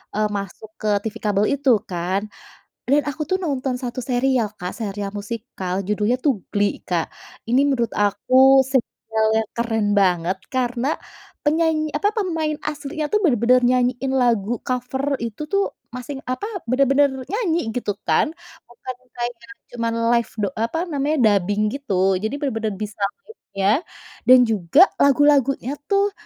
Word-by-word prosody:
eee, 215 0 +2
masuk 200 +2 -7
ke 215 - -4
TV 220 0 -5
kabel 205 0 +2
itu 280 -1 0 0.2
kan, 180 +2 -1 0.7
dan 285 +3 +3
aku 290 +1 -5
tuh 375 - +1
nonton 270 -5 -1
1 250 0 -5
serial 250 -1 +1
Kak, 180 -2 -5
serial 200 -2 -4
musikal 205 -3 -4
judulnya 210 +4 +1
tuh 270 -8 +2 0.2
Glee 205 0 +1
Kak. 170 -3 -1 0.4
Ini 250 +3 +4
menurut 240 -5 0
aku 260 +6 +4
serial 225 -4 -1 0.2
yang 215 - -17
keren 225 -2 0
banget 180 -1 +2 0.2
karena 250 0 0 0.6
penyanyi 310 0 +1
apa 355 +7 +2
pemain 325 -7 -1
aslinya 300 +1 -4
tuh 425 - +3
bener-bener 250 - +4
nyanyiin 250 +1 +1
lagu 235 -2 +1
cover 265 +2 -1
itu 230 +2 -5
tuh 395 0 +3 0.3
masih 250 +3 -6 0.2
apa, 330 +11 -3 0.2
bener-bener 275 +2 +4 0.2
nyanyi 390 -6 0 0.2
gitu 245 -4 -1 0.2
kan 160 - +3 0.4
bukan 245 +1 -8 0.2
kayak 240 0 -2 0.4
cuma 230 -1 -1 0.3
live 235 -1 0
da 205 - +1
eee, 220 - -1
apa 325 - -3
namanya 295 -1 0
dubbing 205 +1 +2
gitu, 195 -8 +1
jadi 220 - -2
bener-bener 225 -7 -2
bisa 210 0 -8 0.2
liriknya, 195 - -3 0.6
dan 255 +1 +9
juga 205 - +3 0.2
lagu-lagunya 275 -2 +3 0.2
tuh, 400 0 +2
245 Hz, 145 wpm, -22 LUFS, 210-280 Hz, 0.7 s, dan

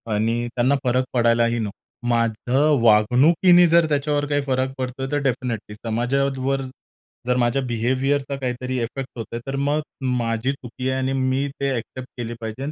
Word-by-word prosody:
आणि 115 +3 0
त्यांना 125 +3 +3
फरक 125 +1 +2
पडायलाही 115 -1 +2
नको. 105 -3 -4 0.3
माझ्या 120 +2 +1 0.2
वागणुकीने 140 - +5
जर 170 0 +5
त्याच्यावर 145 0 0
काही 145 0 +1
फरक 130 -1 0
पडतोय, 130 +1 -4
तर 145 - +1
डेफिनिटली 125 -5 -2
समाजावर 130 +4 -1 0.7
जर 125 - +2
माझ्या 120 +2 +1
बिहेवियरचा 130 +4 0
काहीतरी 130 0 -3
इफेक्ट 130 +3 -5
होतोय, 115 0 -5
तर 135 - -2
मग 145 +2 0 0.4
माझी 115 +2 -1
चुकी 130 -1 -5
आहे 130 - 0
आणि 130 0 -1
मी 130 +1 0
ते 140 - 0
ॲक्सेप्ट 125 +2 -6
केले 120 -1 -4
पाहिजे 110 +3 -5
आणि 145 - -3
130 Hz, 155 wpm, -22 LUFS, 120-135 Hz, 0.7 s, वागणुकीने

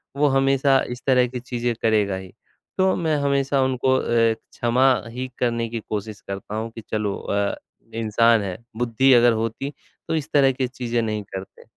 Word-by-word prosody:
वो 145 +1 +3
हमेशा 135 0 +3
इस 125 0 -6
तरह 125 -2 +4
की 125 +1 -6
चीज़ें 120 -1 -2
करेगा 105 -3 +2
ही। 95 -1 -8 0.5
तो 190 0 +3
मैं 160 -3 0
हमेशा 140 -1 +1
उनको 130 0 +1
अ, - - -2 0.3
क्षमा 120 +3 0 0.2
ही 125 +3 -5
करने 115 -1 0
की 115 0 -4
कोशिश 105 -1 -4
करता 100 +2 -6
हूँ 110 +1 -3
कि 115 - -9
चलो 105 -2 -1
अ, 100 0 -1 0.4
इंसान 115 0 +3
है, 95 -3 -4 0.2
बुद्धि 120 +3 +3
अगर 120 0 +6
होती 115 +6 -3 0.3
तो - - 0
इस 155 -1 -3
तरह 135 -2 +5
की 130 0 -2
चीज़ें 120 -2 -2
नहीं 110 -2 -2
करते। 95 0 -9
120 Hz, 180 wpm, -23 LUFS, 110-135 Hz, 0.5 s, अगर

